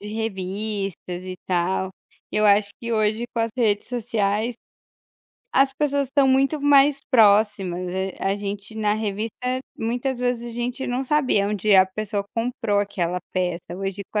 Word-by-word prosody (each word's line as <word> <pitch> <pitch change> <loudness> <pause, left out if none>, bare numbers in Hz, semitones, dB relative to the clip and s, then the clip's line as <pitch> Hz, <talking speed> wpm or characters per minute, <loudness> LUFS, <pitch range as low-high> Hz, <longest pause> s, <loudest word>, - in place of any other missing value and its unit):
de 205 - -9
revistas, 200 -2 -3 0.3
e 185 - -5
tal. 185 +1 0 0.4
Eu 215 0 +2
acho 205 0 +5
que 235 0 -3
hoje, 215 +1 +1
com 230 - 0
as 225 - -1
redes 215 -4 +1
sociais, 220 -1 -1 1.0
as 270 0 +4
pessoas 285 -1 +1
estão 270 +1 +2
muito 270 +3 +2
mais 280 0 +5
próximas, 205 -6 +3
hã, 190 +1 -2
a 195 +1 0
gente, 205 +1 -6
na 210 -1 +1
revista, 215 0 -3 0.4
muitas 245 +3 -2
vezes 245 -1 -1
a - - -8
gente 240 +3 -3
não 250 +2 -1
sabia 260 -8 +2
onde 210 0 +2
a 190 -1 +8
pessoa 200 +1 -3
comprou 230 -3 0
aquela 180 -3 -1
peça, 180 -2 -2
hoje 195 +1 -4
com 210 - +1
215 Hz, 155 wpm, -23 LUFS, 195-245 Hz, 1.0 s, a